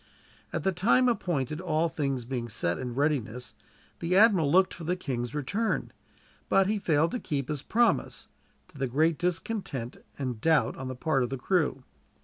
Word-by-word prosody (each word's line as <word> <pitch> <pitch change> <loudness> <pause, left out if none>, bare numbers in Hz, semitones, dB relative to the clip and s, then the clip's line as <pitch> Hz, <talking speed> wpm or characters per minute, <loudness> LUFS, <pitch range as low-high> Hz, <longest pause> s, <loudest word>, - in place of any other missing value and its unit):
At - - -3
the 190 - +2
time 225 +8 +3
appointed, 160 - -1
all 165 -2 +1
things 135 -6 -2
being 120 -2 -4
set 85 -5 0
in 125 -2 -5
readiness, 125 -4 -1 0.5
the 180 +2 +1
admiral 195 -9 +5
looked 185 +2 +4
for 170 - -9
the 175 +3 0
king's 130 -6 -4
return; 200 - -1 0.6
but 195 - +4
he 210 +2 0
failed 160 -3 +2
to 250 - -2
keep 140 - -3
his 150 -3 -3
promise, 235 +7 +1 0.4
to 145 - -15
the 135 - 0
great 155 +5 +1
discontent 175 - -2 0.2
and 125 -5 -4
doubt 160 -2 +3
on 130 - -6
the 130 - -5
part 135 +1 0
of 120 - 0
the 135 - -3
crew. 145 -3 0
150 Hz, 175 wpm, -28 LUFS, 130-180 Hz, 0.6 s, admiral